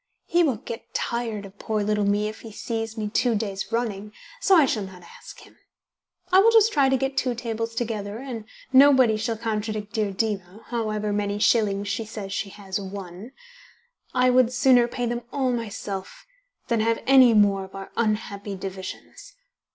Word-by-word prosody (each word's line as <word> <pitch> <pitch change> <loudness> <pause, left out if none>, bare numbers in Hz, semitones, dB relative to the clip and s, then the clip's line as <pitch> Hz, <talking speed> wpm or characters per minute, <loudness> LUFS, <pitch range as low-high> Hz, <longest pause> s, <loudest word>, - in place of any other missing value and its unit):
He 350 0 +2
will 290 -8 +2
get 230 +2 -9
tired 230 -4 -2
of 195 +1 -14
poor 215 -1 -1
little 210 0 +1
me 205 +1 +1
if 215 - -8
he 225 - -10
sees 225 +1 -4
me 215 -1 -2
two 235 +2 +1
days 200 -2 -3
running, 210 -3 -2 0.3
so 395 -6 +4
I 315 -5 +6
shall 225 -4 -1
not 185 -2 -11
ask - - -13
him. - - -18 0.7
I 375 - +7
will 430 +4 +6
just 450 -1 +5
try 275 -3 +4
to 265 - +3
get 270 +1 -2
two 255 -2 0
tables 230 -1 -4
together, 215 -3 -3
and 240 -4 -7 0.3
nobody 260 -4 +6
shall 220 +1 -2
contradict 215 -2 -3
dear 215 -2 0
Diva, 195 -1 -3
however 215 -3 -2
many 205 0 -1
shillings 205 -2 +2
she 225 - -2
says 210 -3 -7
she 200 +1 -3
has 195 -1 -5
won. 195 +3 -8 0.8
I 250 0 +3
would 250 -1 +4
sooner 245 -1 +4
pay 245 0 -3
them 240 0 -2
all 265 -3 0
myself 205 -4 -5 0.4
than 235 -3 +1
have 225 +1 0
any 260 -3 +7
more 200 -2 +4
of 190 - -15
our 195 0 -8
unhappy 210 -2 -2
divisions. 190 - -8
220 Hz, 180 wpm, -24 LUFS, 205-240 Hz, 0.8 s, I